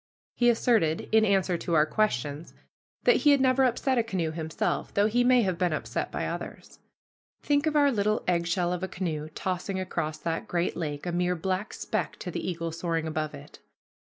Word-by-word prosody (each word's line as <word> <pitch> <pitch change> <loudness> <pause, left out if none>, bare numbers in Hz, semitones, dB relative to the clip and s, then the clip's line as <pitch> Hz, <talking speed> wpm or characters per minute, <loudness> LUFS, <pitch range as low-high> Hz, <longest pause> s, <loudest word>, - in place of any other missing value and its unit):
He 240 -1 +3
asserted, 225 -9 +2
in 220 0 +5
answer 190 -4 +2
to 170 - -1
our 150 -1 +5
questions, 150 - -1 0.5
that - - +5
he 295 - +3
had 285 -1 +6
never 260 0 +3
upset 255 +1 +1
a - - +2
canoe 185 -8 -2
himself, 160 -1 -2
though 200 - +4
he 240 +3 +2
may 250 -1 +5
have 185 -4 -1
been 180 -3 +1
upset - - -3
by - - -2
others. - - -7 0.6
Think 290 +1 +2
of 305 - 0
our 285 -1 +5
little 215 -2 0
eggshell 175 0 +1
of 180 - -3
a 190 - -2
canoe 155 -5 -4
tossing 185 +1 -2
across 160 -4 -3
that 165 +1 -3
great 175 0 -1
lake, 150 -3 -4
a 175 - -1
mere 180 +1 +1
black 185 +4 -2
speck - - -3
to - - -6
the - - -4
eagle 165 -1 -3
soaring 165 -1 -2
above 155 -1 -3
it! - - -13
180 Hz, 195 wpm, -27 LUFS, 165-220 Hz, 0.6 s, had